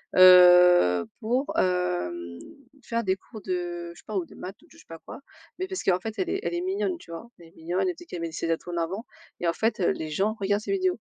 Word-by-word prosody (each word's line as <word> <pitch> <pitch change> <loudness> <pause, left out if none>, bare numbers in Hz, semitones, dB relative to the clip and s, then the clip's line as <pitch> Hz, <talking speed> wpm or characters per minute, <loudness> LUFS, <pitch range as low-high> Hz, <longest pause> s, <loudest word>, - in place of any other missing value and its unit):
heu, 180 - +7
pour, 245 +5 -1
hem, 175 - -1 0.4
faire 230 -1 -2
des 190 -1 +1
cours 215 +2 -13
de 175 -2 -4
je - - -15
sais - - -20
pas 215 - -6
ou 185 - -1
de - - -16
maths 190 +2 -9
ou 335 - -21
de - - -27
je 330 - -18
sais 310 - -18
pas 165 -1 -10
quoi. - - -9 0.4
Mais 375 +1 -3
parce 380 0 -4
qu'en 185 -1 +2
fait 220 +3 -5
elle 360 -2 -1
est 390 +2 -2
elle - - -2
est 345 - -2
mignonne 375 -1 -1
tu - - -17
vois? 165 +8 -8
Elle 170 - -14
est 165 - -23
mignonne, 175 - -2
elle 360 - -4
dit 350 +1 -13
qu'elle 175 - -7
met 165 -1 -4
ses 165 +1 -3
atouts 165 +2 -3
en 170 - -4
avant 185 +7 -3 0.4
et 175 - -1
en 170 - +2
fait, 220 +1 -1
heu, 175 - +2
les 155 -1 -5
gens 200 +8 0
regardent 205 +1 0
ses 305 - -5
vidéos. 370 -2 0
185 Hz, 270 wpm, -26 LUFS, 170-240 Hz, 0.4 s, heu